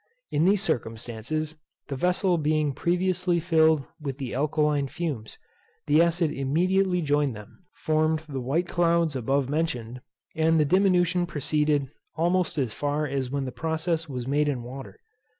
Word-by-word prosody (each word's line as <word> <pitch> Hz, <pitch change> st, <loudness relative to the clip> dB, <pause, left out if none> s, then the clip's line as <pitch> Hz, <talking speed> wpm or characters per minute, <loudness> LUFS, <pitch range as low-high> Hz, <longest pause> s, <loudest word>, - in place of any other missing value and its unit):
In 150 Hz, +3 st, +2 dB
these 200 Hz, +1 st, +3 dB
circumstances, 120 Hz, -, -3 dB, 0.3 s
the 140 Hz, -, -4 dB
vessel 180 Hz, +3 st, +1 dB
being 150 Hz, -1 st, +1 dB
previously 180 Hz, +2 st, 0 dB
filled 160 Hz, -4 st, +3 dB, 0.2 s
with 135 Hz, -3 st, -4 dB
the 135 Hz, -4 st, -5 dB
alkaline 150 Hz, 0 st, +1 dB
fumes, 135 Hz, -8 st, -5 dB, 0.5 s
the 150 Hz, +2 st, +4 dB
acid 170 Hz, -2 st, +2 dB
immediately 180 Hz, +6 st, +1 dB
joined 145 Hz, -4 st, +1 dB
them, 105 Hz, -, -13 dB
formed 155 Hz, 0 st, +1 dB
the 135 Hz, -3 st, -4 dB
white 155 Hz, +8 st, 0 dB
clouds 170 Hz, -3 st, +2 dB
above 135 Hz, +2 st, 0 dB
mentioned, 125 Hz, -6 st, -2 dB, 0.3 s
and 160 Hz, 0 st, +3 dB
the 150 Hz, -, +4 dB
diminution 180 Hz, 0 st, +3 dB
proceeded 150 Hz, -2 st, 0 dB, 0.3 s
almost 175 Hz, +1 st, +1 dB
as 125 Hz, -6 st, -1 dB
far 145 Hz, +1 st, -1 dB
as 135 Hz, -2 st, -2 dB
when 140 Hz, 0 st, -2 dB
the 130 Hz, -, -4 dB
process 160 Hz, +4 st, -2 dB
was 125 Hz, -3 st, -4 dB
made 145 Hz, +3 st, +1 dB
in 130 Hz, -4 st, -2 dB
water. 135 Hz, -, -9 dB
155 Hz, 150 wpm, -26 LUFS, 135-170 Hz, 0.5 s, the